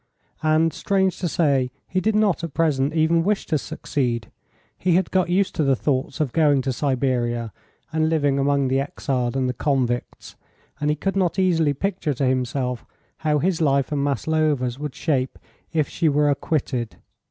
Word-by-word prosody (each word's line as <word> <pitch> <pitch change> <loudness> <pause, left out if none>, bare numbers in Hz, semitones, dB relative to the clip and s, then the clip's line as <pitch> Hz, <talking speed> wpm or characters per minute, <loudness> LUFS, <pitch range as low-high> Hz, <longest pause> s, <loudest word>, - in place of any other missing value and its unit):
And, 155 +1 +2
strange 190 -2 0
to 180 - -1
say, 140 -6 +1 0.2
he 185 - -1
did 215 +3 +1
not 210 -5 +2
at 165 -5 -5
present 150 -2 +1
even 165 +1 +3
wish 205 +2 0
to 155 - 0
succeed; 120 -5 -3 0.4
he 180 -2 +1
had 185 0 +1
got 185 -2 +2
used 190 +2 +1
to 155 - 0
the 135 -1 +3
thought 130 +3 -1
of 145 -6 -1
going 145 -5 +3
to 130 0 -1
Siberia 120 -4 -1 0.4
and 160 0 +2
living 145 -4 +1
among 140 0 +2
the 135 +1 +1
exiled 135 -3 -2
and 130 -1 +1
the 125 - -1
convicts, 125 -4 -2 0.4
and 150 - 0
he 150 - +2
could 195 +5 -2
not 185 -2 +1
easily 165 -6 +2
picture 180 -4 -2
to 135 - 0
himself 125 -1 -1 0.3
how 150 -1 +1
his 170 +2 0
life 140 -2 +2
and 145 -2 0
Maslova's 145 -3 0
would 150 -2 -5
shape 135 -5 -1 0.3
if 155 -3 +1
she 165 -2 +1
were 145 0 +3
acquitted. 130 -6 -2
145 Hz, 175 wpm, -23 LUFS, 130-165 Hz, 0.4 s, even